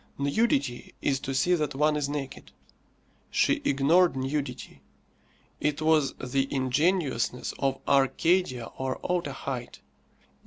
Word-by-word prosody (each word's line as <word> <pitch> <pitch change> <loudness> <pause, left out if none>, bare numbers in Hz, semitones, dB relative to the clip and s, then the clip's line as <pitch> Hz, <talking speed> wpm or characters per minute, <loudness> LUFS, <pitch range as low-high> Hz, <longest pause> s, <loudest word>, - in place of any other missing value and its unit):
Nudity 140 - 0
is 135 -2 0
to 135 0 -4
see 180 +7 +3
that 150 -4 0
one 150 +2 +2
is 145 -1 -1
naked. 145 -2 -6 0.8
She - - +2
ignored 155 +5 +3
nudity. 135 0 -4 0.8
It 150 0 0
was 155 -3 +2
the 135 +1 -2
ingenuousness 135 -1 0
of 135 -1 0
Arcadia 140 -1 +2
or 130 -1 -2
Otaheite. 135 -7 -3
140 Hz, 110 wpm, -27 LUFS, 135-155 Hz, 0.8 s, see